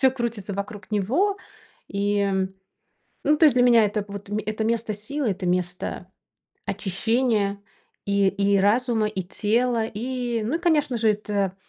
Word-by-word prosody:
всё 265 0 +5
крутится 235 -6 -4
вокруг 200 +2 -6
него. 275 - +1 0.5
И 200 0 0 0.9
ну 300 +2 +4
то 320 - +4
есть 270 - +5
для 245 - +4
меня 235 -3 +6
это 210 0 -1
вот 200 0 -8
мь 210 +1 -2
это 215 +1 -2
место 225 -1 0
силы, 245 +5 -3
это 185 -1 -3
место 180 0 -2 0.6
очищения 210 0 0 0.4
и 200 -1 +2
и 200 +1 +2
разума, 220 +1 +2
и 195 -3 -3
тела. 225 +5 0
И, 240 +1 -3
ну 245 +9 -1
и 335 - -1
конечно 300 -7 +2
же, 220 -1 +3
это 205 -2 -1
215 Hz, 155 wpm, -24 LUFS, 200-245 Hz, 0.9 s, меня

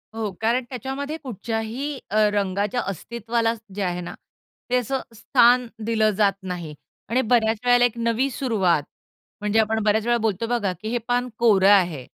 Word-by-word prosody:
हो. 215 -3 -2
कारण 240 +3 +1
त्याच्यामध्ये 270 +5 -4
कुठच्याही 235 +4 -4
अ, 215 - -1 0.2
रंगाच्या 205 +4 0
अस्तित्वाला 230 +4 -2 0.2
जे 205 - -3
आहे 180 -1 -2
ना, 175 - -7 0.6
ते 250 - +3
असं 260 +2 -1
स्थान 245 +1 +4 0.2
दिलं 220 -1 +2
जात 200 -2 +3
नाही. 175 -4 -5 0.4
आणि 255 +3 +2
बऱ्याच 225 -2 +3
वेळेला 245 0 +5
एक 240 -1 -2
नवी 235 +3 +1
सुरुवात 195 - +1 0.6
म्हणजे 210 +1 +1
आपण 220 0 +1
बऱ्याच 215 +1 +2
वेळा 240 0 +3
बोलतो 220 +1 0
बघा, 225 -5 0
की 215 +6 -9
"हे 240 - 0
पान 245 +1 0
कोरं 200 -5 +4
आहे." 175 -10 +3
225 Hz, 165 wpm, -23 LUFS, 205-245 Hz, 0.6 s, वेळेला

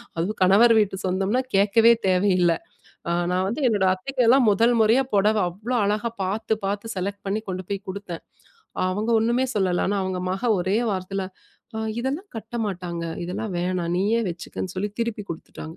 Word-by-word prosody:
அதுவும் 175 +6 -2
கணவர் 220 +5 +6
வீட்டு 200 -2 0
சொந்தம்ன்னா 195 +7 +1
கேட்கவே 225 +4 +5 0.2
தேவையில்ல 185 -2 +3 0.6
அ - - +2 0.2
நான் 185 +1 +1
வந்து 245 +7 -3
என்னோட 200 -4 +2
அத்தைக்கெல்லாம் 250 +4 +3
முதல் 230 +4 +3
முறையா, 225 +5 +4
புடவை 210 +1 +3
அவ்ளோ 215 +8 -5
அழகா 210 +3 0
பார்த்து, 220 +4 -1
பார்த்து 205 +3 -3
செலக்ட் 200 +2 -4
பண்ணி 215 +2 -1
கொண்டு 185 0 -4
போய் 200 0 -3
கொடுத்தேன். 185 -3 -7 0.7
அவுங்க 210 +5 -1
ஒன்னுமே 240 +3 +1
சொல்லல. 185 -4 +1
ஆனா, 205 - 0
அவுங்க 185 -1 -2
மக 225 +5 -1
ஒரே 190 +3 0 0.2
வார்த்தையில 190 +1 -3 0.5
''அ - - -3 0.2
இதெல்லாம் 285 +11 -3
கட்ட 225 +2 -8
மாட்டாங்க, 175 -3 -4 0.2
இதெல்லாம் 185 +4 -4
வேணாம். 180 -1 -1
நீயே 220 +4 +2
வச்சுக்கன்னு'' 175 +2 -6
சொல்லி 205 +3 -2
திருப்பி 230 -3 -2
கொடுத்துட்டாங்க. 160 0 -8
200 Hz, 160 wpm, -24 LUFS, 185-225 Hz, 0.7 s, கணவர்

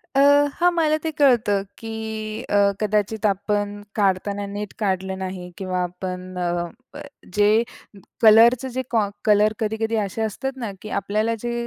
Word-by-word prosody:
अ, - - +4 0.4
हां. 350 +1 +3
मला 310 -2 +3
ते 320 - -1
कळतं 235 -8 +4 0.2
की 225 - -8 0.6
अ, - - 0 0.2
कदाचित 215 +1 0
आपण 205 +1 0 0.3
काढताना 200 0 0
नीट 205 -1 -5
काढलं 190 -2 -1
नाही, 185 -1 -6
किंवा 185 -2 -2
आपण 180 +1 -6
अ, 175 -1 -1 0.7
जे 205 0 +4 0.8
कलरच 230 +3 +7
जे 260 - 0
कॉ 225 -3 +3 0.2
कलर 210 0 +4
कधी-कधी 220 +1 -1
असे 200 +3 -4
असतात 220 +5 -3
ना, 230 -5 -4
की 215 - -7
आपल्याला 215 +4 0
जे 240 - -2
210 Hz, 145 wpm, -22 LUFS, 190-225 Hz, 0.8 s, कलरच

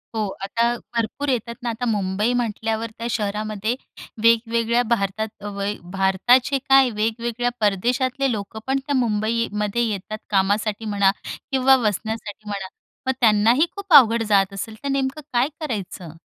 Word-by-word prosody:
हो, 215 -2 0 0.2
आता 200 +4 0 0.3
भरपूर 235 +5 -1
येतात 235 -2 -1
ना. 240 - -1
आता 235 +2 -3
मुंबई 210 +1 0
म्हटल्यावर 225 -1 -2
त्या 230 - -4
शहरामध्ये 215 +1 -2 0.5
वेगवेगळ्या 230 +1 +3
भारतात, 220 -1 0
अ, 205 - -11
व 200 -1 -5
य 200 +1 -1 0.2
भारताचे 240 +8 +3
काय 270 -1 +6
वेगवेगळ्या 230 +2 -1
परदेशातले 250 +6 +1
लोकं 215 0 -5
पण 270 +1 +1
त्या 285 -1 -1
मुंबईमध्ये 220 -1 0
येतात, 215 0 -4
कामासाठी 205 +2 +1
म्हणा 200 -2 +3 0.4
किंवा 265 0 +5
वसण्यासाठी 215 -2 -3
म्हणा. 200 -2 -4 0.4
मग 260 - +3
त्यांनाही 225 +6 +4
खूप 400 -3 -3
अवघड 230 -5 +7
जात 195 -1 +3
असेल, 215 +3 -5
तर - - -3
नेमकं 275 +2 -1
काय 245 +2 +3
करायचं? 200 - -5
225 Hz, 145 wpm, -22 LUFS, 205-245 Hz, 0.5 s, अवघड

